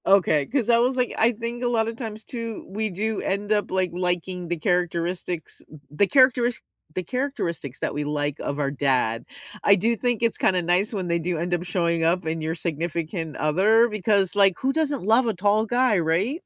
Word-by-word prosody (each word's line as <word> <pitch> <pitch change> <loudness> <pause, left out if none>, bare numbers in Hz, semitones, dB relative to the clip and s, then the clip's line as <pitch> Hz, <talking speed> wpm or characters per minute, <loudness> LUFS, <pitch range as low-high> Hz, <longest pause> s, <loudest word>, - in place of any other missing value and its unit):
Okay, 155 -7 +3
'cause 245 -3 -1
I 235 -1 +5
was 250 +2 +2
like, 250 -2 0
I 225 +2 +4
think 235 +1 -5
a - - +1
lot 225 -2 +1
of 230 - -4
times 220 -2 -6
too, 230 -3 -6
we 215 +3 -2
do 210 +3 -2
end 205 +2 -2
up, 210 -1 +1
like, 185 -1 0
liking 180 0 -2
the 175 +1 -2
characteristics 175 0 -2 0.3
the 175 +7 +2
characteris 250 -2 +3 0.4
the 185 - -2
characteristics 175 - -3
that - - -2
we 150 - -2
like 145 0 -2
of 140 - -3
our 140 -1 0
dad. 130 -5 0 0.4
I 200 - +6
do 225 +5 +1
think 240 0 -1
it's 230 -1 +1
kinda 185 -1 +2
nice 180 +4 +1
when 190 -4 -3
they 170 0 +1
do 170 +1 -2
end 175 +2 -2
up 175 0 0
showing 170 -2 0
up 175 +2 +1
in 160 0 -2
your 160 +1 -2
significant 165 0 -3
other 205 +10 +4
because, 205 -3 +1
like, 195 -3 +4
who 270 +1 0
doesn't 290 -6 -1
love 225 +5 +4
a 225 - 0
tall 205 +3 +2
guy, 240 -3 +2
right? 185 - 0
190 Hz, 205 wpm, -24 LUFS, 170-230 Hz, 0.4 s, I